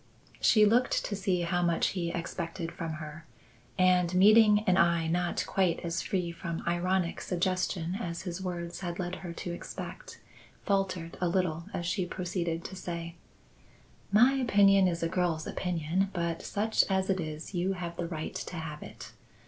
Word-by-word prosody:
She 215 Hz, -1 st, +5 dB
looked 235 Hz, +4 st, +2 dB
to 205 Hz, -, -2 dB
see 190 Hz, -2 st, 0 dB
how 175 Hz, +1 st, 0 dB
much 170 Hz, -1 st, +2 dB
he 175 Hz, -3 st, -2 dB
expected 170 Hz, 0 st, -4 dB
from 165 Hz, -2 st, -4 dB
her, 155 Hz, +1 st, -8 dB, 0.5 s
and, 180 Hz, -1 st, +3 dB
meeting 210 Hz, +2 st, +7 dB
an 185 Hz, -, +4 dB
eye 170 Hz, -2 st, +3 dB
not 175 Hz, +1 st, 0 dB
quite 185 Hz, -3 st, +1 dB
as 170 Hz, 0 st, -2 dB
free 180 Hz, -3 st, -1 dB
from 170 Hz, -1 st, -5 dB
ironic 175 Hz, 0 st, 0 dB
suggestion 180 Hz, -1 st, -1 dB
as 170 Hz, -5 st, -4 dB
his 180 Hz, 0 st, -5 dB
words 175 Hz, -1 st, -4 dB
had 175 Hz, -2 st, -4 dB
led 180 Hz, 0 st, -3 dB
her 175 Hz, -3 st, -7 dB
to 175 Hz, -, -5 dB
expect, -, -, -8 dB, 0.5 s
faltered 185 Hz, -4 st, -1 dB
a 180 Hz, -, +2 dB
little 170 Hz, -2 st, 0 dB
as 175 Hz, -, -3 dB
she 180 Hz, +1 st, -1 dB
proceeded 175 Hz, -2 st, -3 dB
to 190 Hz, -, -6 dB
say: 170 Hz, -2 st, -5 dB, 1.0 s
"My 240 Hz, +6 st, +6 dB
opinion 200 Hz, -7 st, +5 dB
is 170 Hz, -1 st, -1 dB
a -, -, +2 dB
girl's 165 Hz, -2 st, 0 dB
opinion, 180 Hz, +2 st, -1 dB
but 170 Hz, -2 st, -2 dB
such 215 Hz, +2 st, +1 dB
as 190 Hz, 0 st, +1 dB
it 190 Hz, -, 0 dB
is 155 Hz, +2 st, -5 dB
you 180 Hz, +2 st, 0 dB
have 175 Hz, -2 st, -5 dB
the 170 Hz, 0 st, -3 dB
right 160 Hz, -2 st, -5 dB
to -, -, -5 dB
have 160 Hz, -2 st, -6 dB
it. -, -, -10 dB
175 Hz, 170 wpm, -30 LUFS, 170-190 Hz, 1.0 s, meeting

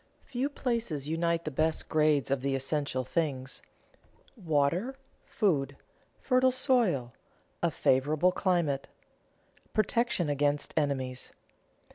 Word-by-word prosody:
Few 260 Hz, +2 st, -2 dB
places 230 Hz, -, -2 dB
unite 170 Hz, +1 st, 0 dB
the 155 Hz, -, -2 dB
best 155 Hz, +3 st, 0 dB
grades 150 Hz, -4 st, +2 dB
of 135 Hz, -2 st, +1 dB
the 135 Hz, 0 st, 0 dB
essential 135 Hz, -1 st, -1 dB
things: 135 Hz, -3 st, -2 dB, 0.7 s
water, 175 Hz, -, 0 dB, 0.3 s
food, 145 Hz, -, 0 dB, 0.4 s
fertile 255 Hz, 0 st, +3 dB
soil, 230 Hz, -, +1 dB, 0.5 s
a -, -, +3 dB
favorable 150 Hz, +7 st, +2 dB
climate, 170 Hz, -8 st, 0 dB, 0.9 s
protection 215 Hz, -4 st, +1 dB
against 145 Hz, 0 st, 0 dB
enemies. 130 Hz, -4 st, -2 dB
155 Hz, 100 wpm, -30 LUFS, 140-190 Hz, 0.9 s, fertile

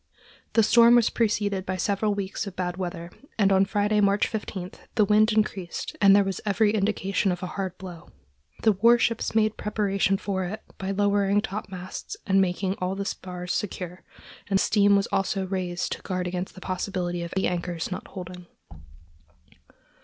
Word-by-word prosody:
The 225 Hz, -, +5 dB
storm 235 Hz, +2 st, +6 dB
was 240 Hz, -2 st, +4 dB
preceded 205 Hz, -4 st, 0 dB
by 185 Hz, 0 st, -3 dB
several 205 Hz, +2 st, 0 dB
weeks 200 Hz, +1 st, -3 dB
of 190 Hz, -, -7 dB
bad 180 Hz, -1 st, -2 dB
weather, 175 Hz, -2 st, -5 dB, 0.3 s
and 200 Hz, -3 st, +3 dB
on 190 Hz, 0 st, +4 dB
Friday, 210 Hz, +1 st, +1 dB
March 200 Hz, 0 st, +3 dB
15, 195 Hz, -4 st, -5 dB, 0.2 s
the 215 Hz, -, +4 dB
wind 215 Hz, +2 st, +4 dB
increased 205 Hz, -5 st, -2 dB
and 200 Hz, -1 st, +7 dB
there 200 Hz, -, +5 dB
was 195 Hz, -1 st, -3 dB
every 210 Hz, +1 st, +2 dB
indication 195 Hz, -2 st, 0 dB
of 180 Hz, +1 st, -4 dB
a 180 Hz, -, -5 dB
hard 190 Hz, -2 st, -4 dB
blow. 180 Hz, -3 st, -10 dB, 0.5 s
The 220 Hz, -, +6 dB
war 230 Hz, +5 st, +5 dB
ships 230 Hz, -1 st, -1 dB
made 215 Hz, -1 st, +2 dB
preparation 200 Hz, -2 st, 0 dB
for 195 Hz, -2 st, -2 dB
it 210 Hz, +5 st, -6 dB, 0.2 s
by 190 Hz, -, -3 dB
lowering 200 Hz, 0 st, +2 dB
topmasts 190 Hz, -3 st, -6 dB
and 195 Hz, 0 st, +4 dB
making 190 Hz, +1 st, -1 dB
all 185 Hz, +1 st, -1 dB
the 200 Hz, 0 st, -3 dB
spars 180 Hz, -2 st, -5 dB
secure, 180 Hz, -3 st, -4 dB, 0.5 s
and 195 Hz, -1 st, +3 dB
steam 205 Hz, -1 st, +4 dB
was 200 Hz, 0 st, +2 dB
also 195 Hz, 0 st, 0 dB
raised 180 Hz, -2 st, -3 dB
to -, -, -4 dB
guard 185 Hz, -1 st, -3 dB
against 180 Hz, +1 st, -4 dB
the 190 Hz, -, -11 dB
possibility 180 Hz, -1 st, -3 dB
of 170 Hz, 0 st, -5 dB
the 190 Hz, -, +1 dB
anchors 175 Hz, 0 st, -3 dB
not 185 Hz, -, -5 dB
holding. 180 Hz, -1 st, -9 dB
195 Hz, 175 wpm, -26 LUFS, 185-205 Hz, 0.5 s, and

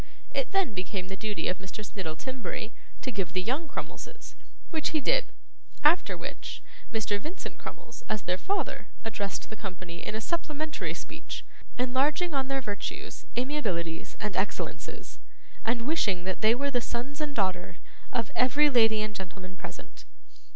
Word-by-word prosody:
It -, -, +1 dB
then 390 Hz, -, +4 dB
became 185 Hz, 0 st, -2 dB
the 195 Hz, -, -2 dB
duty 210 Hz, +1 st, 0 dB
of 180 Hz, -, +1 dB
Mr. 190 Hz, +3 st, -5 dB
Snittle 165 Hz, -6 st, -3 dB
Timberry 235 Hz, -3 st, -3 dB, 0.3 s
to 260 Hz, -, 0 dB
give 190 Hz, -5 st, -1 dB
the 185 Hz, -, +3 dB
young 275 Hz, -, +1 dB
Crummleses, 475 Hz, -, -6 dB, 0.4 s
which 315 Hz, -3 st, +2 dB
he -, -, +4 dB
did; -, -, +3 dB, 0.5 s
after 310 Hz, +4 st, +6 dB
which -, -, -5 dB, 0.3 s
Mr. 215 Hz, -2 st, +2 dB
Vincent 320 Hz, -, -5 dB
Crummles, -, -, -7 dB
as 215 Hz, -2 st, +1 dB
their 180 Hz, +1 st, +1 dB
father, 400 Hz, -, 0 dB, 0.2 s
addressed 205 Hz, -3 st, -1 dB
the -, -, -3 dB
company 185 Hz, -4 st, -5 dB
in -, -, -2 dB
a -, -, +1 dB
supplementary 310 Hz, +3 st, -1 dB
speech, -, -, -5 dB, 0.3 s
enlarging 275 Hz, +7 st, +3 dB
on 270 Hz, -1 st, +2 dB
their 270 Hz, 0 st, +1 dB
virtues, 205 Hz, -4 st, -3 dB
amiabilities, 185 Hz, -, 0 dB
and 210 Hz, -2 st, -1 dB
excellences, 190 Hz, +2 st, -2 dB, 0.4 s
and 235 Hz, +1 st, +2 dB
wishing 205 Hz, -, +3 dB
that 190 Hz, +2 st, -1 dB
they 220 Hz, +1 st, +7 dB
were 280 Hz, +2 st, +1 dB
the 245 Hz, -2 st, +3 dB
sons 260 Hz, +6 st, -3 dB
and 295 Hz, -2 st, -1 dB
daughter 185 Hz, -4 st, +1 dB, 0.3 s
of 230 Hz, -4 st, +1 dB
every 285 Hz, +4 st, +6 dB
lady 225 Hz, -3 st, +6 dB
and 215 Hz, -1 st, -2 dB
gentleman 190 Hz, -1 st, -6 dB
present. -, -, -8 dB
225 Hz, 160 wpm, -31 LUFS, 190-285 Hz, 0.5 s, they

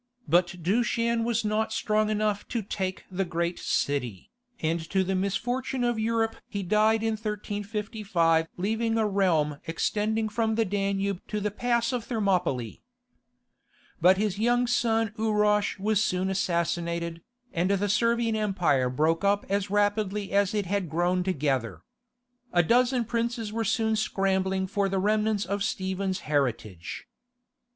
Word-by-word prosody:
But 175 Hz, +2 st, +2 dB
Dushan 230 Hz, +4 st, +1 dB
was 230 Hz, -1 st, 0 dB
not 215 Hz, +1 st, 0 dB
strong 215 Hz, -1 st, +1 dB
enough 210 Hz, -1 st, 0 dB
to 235 Hz, -3 st, -2 dB
take 190 Hz, -1 st, -4 dB
the 190 Hz, +1 st, 0 dB
great 170 Hz, 0 st, -2 dB
city, 125 Hz, -9 st, -2 dB, 0.3 s
and 165 Hz, +1 st, 0 dB
to 190 Hz, -1 st, +2 dB
the 190 Hz, +1 st, -1 dB
misfortune 245 Hz, +7 st, -1 dB
of 240 Hz, -2 st, +1 dB
Europe 225 Hz, 0 st, 0 dB
he 200 Hz, -1 st, -4 dB
died 215 Hz, +4 st, +3 dB
in 225 Hz, -, +1 dB
1355 205 Hz, -5 st, -1 dB
leaving 225 Hz, +4 st, 0 dB
a 220 Hz, -1 st, +2 dB
realm 165 Hz, -8 st, +1 dB
extending 215 Hz, +6 st, 0 dB
from 220 Hz, 0 st, 0 dB
the 225 Hz, 0 st, +2 dB
Danube 195 Hz, -1 st, -1 dB
to 210 Hz, -, -2 dB
the 210 Hz, 0 st, -1 dB
pass 235 Hz, +2 st, 0 dB
of 245 Hz, -2 st, -2 dB
Thermopylae. 180 Hz, -, -1 dB, 1.2 s
But 185 Hz, +3 st, +6 dB
his 205 Hz, -1 st, -1 dB
young 240 Hz, +2 st, +3 dB
son 225 Hz, -3 st, +1 dB
Urosh 210 Hz, -2 st, +2 dB
was 210 Hz, +1 st, +1 dB
soon 185 Hz, 0 st, 0 dB
assassinated, 170 Hz, -2 st, -1 dB, 0.3 s
and 175 Hz, +3 st, +1 dB
the 200 Hz, +1 st, +1 dB
Servian 230 Hz, +2 st, +2 dB
Empire 180 Hz, -12 st, +1 dB
broke 155 Hz, +6 st, +1 dB
up 200 Hz, 0 st, +2 dB
as 200 Hz, 0 st, 0 dB
rapidly 205 Hz, 0 st, 0 dB
as 200 Hz, 0 st, +2 dB
it 205 Hz, -2 st, 0 dB
had 190 Hz, -2 st, -1 dB
grown 175 Hz, +3 st, +1 dB
together. 135 Hz, -, -1 dB, 0.7 s
A 175 Hz, -1 st, +4 dB
dozen 245 Hz, +5 st, +3 dB
princes 230 Hz, -1 st, -2 dB
were 225 Hz, 0 st, -1 dB
soon 220 Hz, +1 st, +1 dB
scrambling 190 Hz, -2 st, 0 dB
for 200 Hz, +1 st, 0 dB
the 195 Hz, -, -1 dB
remnants 210 Hz, +1 st, +1 dB
of 200 Hz, +1 st, -2 dB
Stephen's 190 Hz, -1 st, -2 dB
heritage. 115 Hz, -, -2 dB
200 Hz, 145 wpm, -27 LUFS, 180-220 Hz, 1.2 s, But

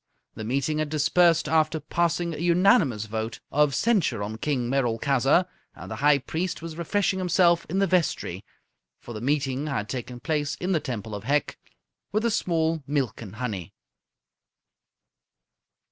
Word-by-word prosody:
The 110 Hz, -, -7 dB
meeting 140 Hz, +6 st, -1 dB
had 155 Hz, -1 st, -1 dB
dispersed 160 Hz, +2 st, +3 dB
after 160 Hz, 0 st, +2 dB
passing 170 Hz, +2 st, -1 dB
a -, -, -6 dB
unanimous 170 Hz, -, +3 dB
vote 110 Hz, +1 st, -4 dB
of 150 Hz, -1 st, +3 dB
censure 180 Hz, -, +1 dB
on 110 Hz, +2 st, -5 dB
King 130 Hz, -4 st, -1 dB
Merolchazzar, 135 Hz, +5 st, +2 dB, 0.3 s
and -, -, -10 dB
the -, -, -4 dB
High 145 Hz, 0 st, +4 dB
Priest 165 Hz, +6 st, -3 dB
was 165 Hz, -1 st, -7 dB
refreshing 190 Hz, +3 st, 0 dB
himself 175 Hz, -2 st, +3 dB
in 185 Hz, -, -1 dB
the 195 Hz, -, +3 dB
vestry 180 Hz, -3 st, 0 dB, 0.6 s
for 120 Hz, -, -9 dB
the 110 Hz, -, -6 dB
meeting 140 Hz, +1 st, 0 dB
had 125 Hz, -8 st, -2 dB
taken 125 Hz, +2 st, -5 dB
place 150 Hz, 0 st, -1 dB
in 180 Hz, +2 st, -3 dB
the 170 Hz, -, +2 dB
Temple 115 Hz, -7 st, -5 dB
of 105 Hz, +1 st, -6 dB
Hec 145 Hz, +1 st, 0 dB, 0.5 s
with 215 Hz, +3 st, 0 dB
a 235 Hz, -, +2 dB
small 165 Hz, -6 st, 0 dB
milk 135 Hz, -7 st, -1 dB
and 105 Hz, -2 st, -9 dB
honey. 105 Hz, -9 st, -5 dB
150 Hz, 155 wpm, -26 LUFS, 125-170 Hz, 0.6 s, High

